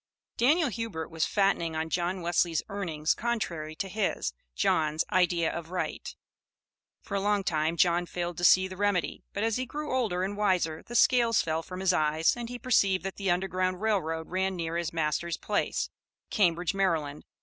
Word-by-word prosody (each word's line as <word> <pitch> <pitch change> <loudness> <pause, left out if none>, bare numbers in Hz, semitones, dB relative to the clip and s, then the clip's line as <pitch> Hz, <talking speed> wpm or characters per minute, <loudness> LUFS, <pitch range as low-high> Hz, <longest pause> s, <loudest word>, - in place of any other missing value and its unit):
Daniel 295 +5 +3
Hubert 220 -8 -4
was 160 -1 0
fattening 195 -5 +1
on 160 +1 -1
John 180 +1 -1
Wesley's 170 -1 +1
earnings 165 -6 -1
contrary 170 -10 -3
to 195 - -3
his, 190 - -1 0.2
John's, 155 - +1
idea 175 -2 +2
of 170 -1 -6
right. 180 0 -4 0.9
For - - -9
a 200 - +1
long 205 0 +1
time 160 -1 0
John 175 +1 +3
failed 175 -1 -4
to - - -5
see 185 +1 +6
the 185 - -8
remedy, 200 -5 0
but 205 - -3
as 225 0 +1
he 255 0 -3
grew 300 0 -4
older 200 -8 0
and 200 +2 -2
wiser 185 -6 +1
the 240 - -9
scales 235 -3 +4
fell 160 0 -1
from 185 +2 -7
his 190 -1 +3
eyes 155 0 +2
and 240 -1 -6
he 245 - -5
perceived 200 -7 +2
that 195 0 -5
the 195 -1 -1
Underground 185 0 0
Rail 215 -2 +2
Road 160 0 -4
ran 190 +1 0
near 165 -1 -3
his 170 -1 -1
master's 165 +1 -1
place, - - -1 0.4
Cambridge, 175 -2 +2
Md. 165 -7 0
180 Hz, 180 wpm, -28 LUFS, 165-205 Hz, 0.9 s, see